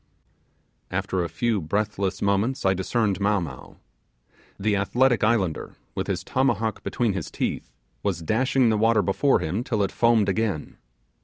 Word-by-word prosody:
After 95 -2 -1
a 85 - -3
few 110 +4 0
breathless 100 +3 -1
moments 100 +6 +1
discerned 100 +1 0
Mow 100 0 +2
Mow. 75 -8 -8 0.8
The 105 +1 +1
athletic 120 +5 +2
islander, 105 -7 0 0.2
with - - -3
his - - -2
tomahawk 115 -5 0
between 105 +2 0
his 95 -4 -4
teeth, - - -3 0.3
was 85 -5 -2
dashing 125 - +2
the 110 -1 +1
water 110 -1 +3
before 115 +10 +2
him 95 +9 -2
till 110 -5 0
it 95 - -1
foamed 115 -3 +3
again. 100 -5 -2
105 Hz, 145 wpm, -25 LUFS, 95-115 Hz, 0.8 s, water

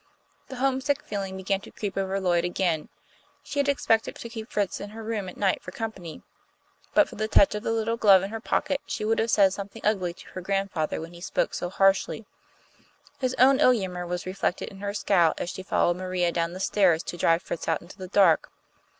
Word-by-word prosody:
The 265 - -8
homesick 270 +2 0
feeling 195 -2 -4
began 195 +1 -1
to - - -12
creep 205 -2 -5
over 195 0 -1
Lloyd 175 -3 +2
again. 175 -3 -1 0.5
She 285 - -4
had 280 0 +2
expected 225 -5 +1
to 235 - -8
keep 225 -1 -7
Fritz 205 -2 -1
in 205 - -6
her 225 +1 -9
room 215 -4 -3
at - - -12
night 195 -2 +1
for - - -8
company. 215 - -6 0.7
But 305 - +6
for - - -11
the 215 +1 -1
touch 200 -2 +5
of 210 - -3
the 225 - -2
little 225 0 0
glove 195 -4 +6
in 195 - -4
her 225 - -4
pocket, 280 +4 -1
she 215 - -3
would 225 +1 +1
have 225 - +1
said 195 -3 +4
something 200 0 -8
ugly 185 -5 +1
to - - -14
her 185 - -7
grandfather 195 -4 -1
when 165 +2 -8
he 170 - -12
spoke 185 - -1
so 175 - -3
harshly. 195 +3 +2 0.9
His 255 -1 -1
own 265 +2 +6
ill - - +6
humour 180 -5 -3
was 175 0 -3
reflected 185 -1 -2
in 195 - -13
her 200 0 -4
scowl 175 -6 +3
as 175 - -3
she - - -7
followed 175 -2 +1
Maria 185 -1 0
down 170 0 -1
the 185 - -7
stairs 185 -4 +3
to - - -6
drive 165 0 +2
Fritz 170 - -5
out 165 -1 0
into 185 +3 -14
the 185 - -6
dark. 185 -4 +4
195 Hz, 220 wpm, -26 LUFS, 180-220 Hz, 0.9 s, But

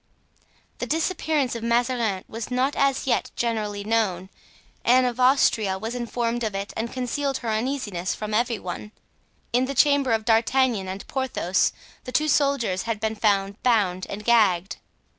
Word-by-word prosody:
The - - -3
disappearance 315 -4 0
of 230 - -5
Mazarin 235 -4 0
was 225 0 -6
not 255 +3 0
as 275 -1 +1
yet 260 - 0
generally 210 -3 -2
known. 200 -4 0 0.5
Anne 255 +1 +5
of 245 0 -2
Austria 230 -6 +3
was 220 +4 -5
informed 240 -1 -2
of 215 -3 -2
it 200 +1 -4
and 230 +1 -3
concealed 270 +2 -2
her - - -1
uneasiness 215 -6 -2
from 215 0 -5
every 235 +1 +1
one. 200 +3 -7 0.6
In 250 +2 +3
the 275 +1 -4
chamber 285 -1 +4
of 220 -1 +1
D'Artagnan 230 -2 +2
and 190 +1 -6
Porthos 260 -9 0 0.3
the 255 - -6
two 305 +4 +1
soldiers 275 -10 +1
had 220 -2 -1
been 220 +1 -1
found 200 -2 0
bound 200 -7 +1
and 210 +1 -6
gagged. 200 -6 +3
230 Hz, 160 wpm, -24 LUFS, 205-255 Hz, 0.6 s, Anne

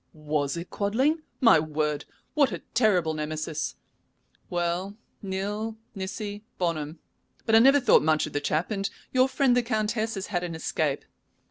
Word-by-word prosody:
"Was 150 -1 -1
it 170 +2 -7
Quadling? 260 +11 +1 0.2
My 230 -10 +7
word! 150 -1 -1 0.3
what 285 -3 +3
a - - -5
terrible 185 -9 +3
Nemesis. 155 0 -3 0.7
Well, 175 +3 -2 0.2
nil 205 +3 -3 0.2
nisi 205 +1 -5
bonum, 165 -3 -2 0.5
but 225 - 0
I 225 - +9
never 270 +4 +7
thought 250 - +5
much 155 0 +2
of 155 - -8
the 145 - -1
chap, 155 +6 0
and 195 -1 -1 0.2
your 255 +1 +4
friend 265 -2 +3
the 245 - +4
Countess 220 -1 -1
has 195 0 -4
had 175 -3 -2
an 170 -2 -4
escape. 155 -3 -1
190 Hz, 155 wpm, -27 LUFS, 155-220 Hz, 0.7 s, I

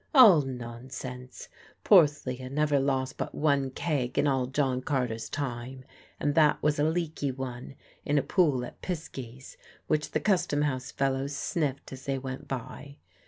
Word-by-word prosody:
All 215 - +9
nonsense! 125 0 -7 0.4
Porthleah 145 -8 +4
never 145 0 +2
lost 135 -1 -1
but - - -4
one 140 -3 +2
keg 130 -3 -2
in - - +3
all 135 -3 +1
John 130 -1 0
Carter's 125 -5 -2
time, 130 -2 -5 0.3
and 145 - +1
that 150 -1 +5
was 150 0 +2
a - - +3
leaky 160 -3 -1
one 130 0 -6 0.3
in 145 - +1
a 140 - +3
pool 140 -5 +2
at - - -12
Pisky's 135 -7 -7 0.3
which 150 0 0
the - - 0
custom 175 -7 +1
house 130 -3 -2
fellows 135 +1 -1
sniffed 145 -3 -2
as 130 0 -10
they 135 -1 -1
went 130 0 -6
by. 140 +2 -6
135 Hz, 155 wpm, -28 LUFS, 130-150 Hz, 0.4 s, All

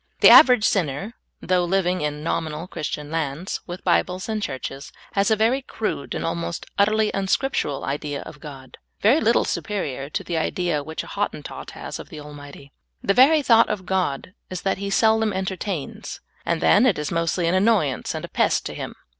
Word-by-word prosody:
The - - +9
average 250 -7 +8
sinner, 195 - 0 0.3
though 180 -1 +1
living 180 0 +1
in 150 0 -3
nominal 160 0 -2
Christian 150 -3 -5
lands, 160 +3 -3
with 175 +1 -7
Bibles 185 +1 +1
and 220 -1 -2
Churches, 135 - -5 0.2
has 200 +1 +1
a 220 - +4
very 230 +5 +2
crude 215 - -4
and - - -3
almost 170 0 -3
utterly 215 +1 +3
unscriptural 195 - -1
idea 145 +1 -3
of 150 - -11
God, 135 -3 -11 0.2
very 245 +10 +4
little 230 +2 +3
superior 145 - -3
to - - -3
the 170 - -3
idea 165 -1 -1
which 160 +2 -5
a - - -12
Hottentot 200 -8 -4
has - - -6
of - - -10
the - - -10
Al 150 0 -9
mighty. 145 -1 -12 0.3
The 200 - +2
very 290 +6 +6
thought 230 -3 +5
of 195 -3 -3
God 185 -3 -1 0.2
is 185 -2 -6
that 195 -1 0
He 200 0 -3
seldom 220 +1 +3
enter 190 0 -2
tains, 185 -7 -5 0.3
and 170 -1 0
then 225 +5 +5
it 215 - +2
is 150 0 -3
mostly 170 +1 0
an 170 - +1
annoyance 185 - +1
and - - -4
a - - -12
pest - - +1
to - - -4
Him. - - -6
180 Hz, 190 wpm, -23 LUFS, 150-210 Hz, 0.3 s, The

